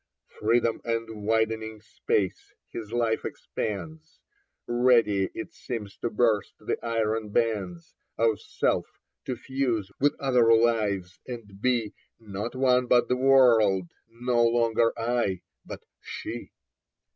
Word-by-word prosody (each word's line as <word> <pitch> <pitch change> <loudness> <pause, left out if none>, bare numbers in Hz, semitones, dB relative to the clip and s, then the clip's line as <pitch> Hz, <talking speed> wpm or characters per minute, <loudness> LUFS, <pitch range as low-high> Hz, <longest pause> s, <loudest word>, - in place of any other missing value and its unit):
Freedom 115 +1 +2
and 115 -2 -3
widening 110 -1 0
space: 100 -2 -2 0.2
his 110 -2 -7
life 115 -2 0
expands, 155 +10 -6 0.5
Ready, 120 -5 +3
it 110 - -6
seems, 105 -5 -6
to 120 - -2
burst 110 -2 +1
the - - -4
iron 110 -2 -1
bands 100 -7 -1 0.2
Of 115 -2 +2
self, - - 0 0.4
to 130 - -2
fuse 120 -5 -2
with 145 +2 +2
other 125 -4 +3
lives 105 -6 +1
and 105 -5 -9
be 120 -4 +1 0.3
Not 105 +2 -6
one 125 -1 +3
but 120 0 +4
the 125 - +3
world, 115 -9 +4 0.2
no 120 +1 0
longer 115 -1 +3
" - - -20 0.2
I 95 -6 -1
" - - -52
but - - -8 0.2
" - - -60
She." - - -7
115 Hz, 130 wpm, -27 LUFS, 105-120 Hz, 0.5 s, but